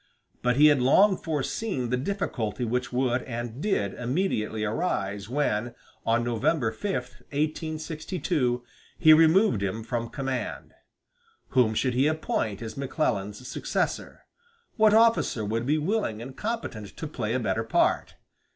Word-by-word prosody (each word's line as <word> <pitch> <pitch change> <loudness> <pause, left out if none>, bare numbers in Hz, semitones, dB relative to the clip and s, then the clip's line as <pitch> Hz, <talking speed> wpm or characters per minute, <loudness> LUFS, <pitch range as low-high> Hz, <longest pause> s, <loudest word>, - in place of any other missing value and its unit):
But 125 0 +2
he 145 +3 +6
had 145 -4 +5
long 190 +10 +5
foreseen 150 - -2
the - - +3
difficulty 125 - -2
which 125 +2 -1
would 125 0 +1
and 120 +1 -5
did 160 - 0
immediately 125 - -1
arise 105 - -2
when, 120 -4 -1 0.3
on 115 +1 +3
November 120 +2 +1
5, 195 - -3
1862, 155 0 -2 0.3
he 155 -2 +7
removed 160 - +5
him 100 +3 -2
from 115 0 -3
command. 135 -2 -4 0.8
Whom 120 -4 +3
should 130 +3 +1
he 130 +4 +3
appoint 120 -9 -1
as 110 -1 -6
McClellan's 125 -6 -2
successor? - - -3 0.5
What 215 -1 +5
officer 225 - +3
would 115 +4 -2
be 150 +2 +3
willing 160 - -1
and 130 +3 -8
competent 205 - -5
to - - -5
play 120 -6 -3
a - - +1
better 115 -1 -1
part? 115 - +1
125 Hz, 135 wpm, -27 LUFS, 115-155 Hz, 0.8 s, he